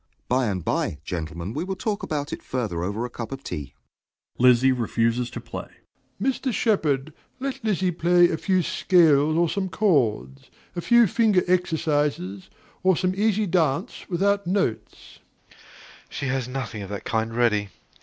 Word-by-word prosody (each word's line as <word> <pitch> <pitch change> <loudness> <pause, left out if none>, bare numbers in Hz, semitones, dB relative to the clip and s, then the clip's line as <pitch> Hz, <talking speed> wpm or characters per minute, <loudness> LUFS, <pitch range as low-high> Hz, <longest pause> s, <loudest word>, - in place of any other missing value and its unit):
By 125 0 +1
and 95 -5 -3
by, 75 - -1
gentlemen, 85 +3 -5
we 155 - -2
will 190 +1 -3
talk 205 +1 -2
about 145 -1 -3
it - - -6
further 110 -10 -3
over 100 +6 -2
a - - -5
cup 120 0 -6
of 135 0 -7
tea. 70 -2 -6 0.6
(Lizzie 125 +1 +5
refuses 120 0 0
to - - -7
play.) - - -7 0.5
DOMINIE. 260 +5 0
Mr. 265 - -1
Shepard, 155 - 0 0.3
let 270 -1 -4
Lizzie 190 -4 +1
play 175 +1 +4
a 160 - -1
few 185 0 +1
scales 155 -5 +3
or 170 0 +3
some 190 +2 -2
chords; 135 - 0 0.3
a 175 - -2
few 235 +4 +5
finger 210 -2 +3
exercises, 150 - 0 0.3
or 185 -2 +3
some 185 -1 0
easy 215 +1 +1
dance 170 - -1
without 200 +1 +1
notes. 120 - -2 0.3
SHEPARD. - - -22 0.5
She 140 - -5
has 130 -2 -1
nothing 125 -4 -5
of 100 - -7
that 100 -1 -5
kind 115 0 -2
ready. 105 -4 +2
145 Hz, 165 wpm, -24 LUFS, 115-185 Hz, 0.6 s, Lizzie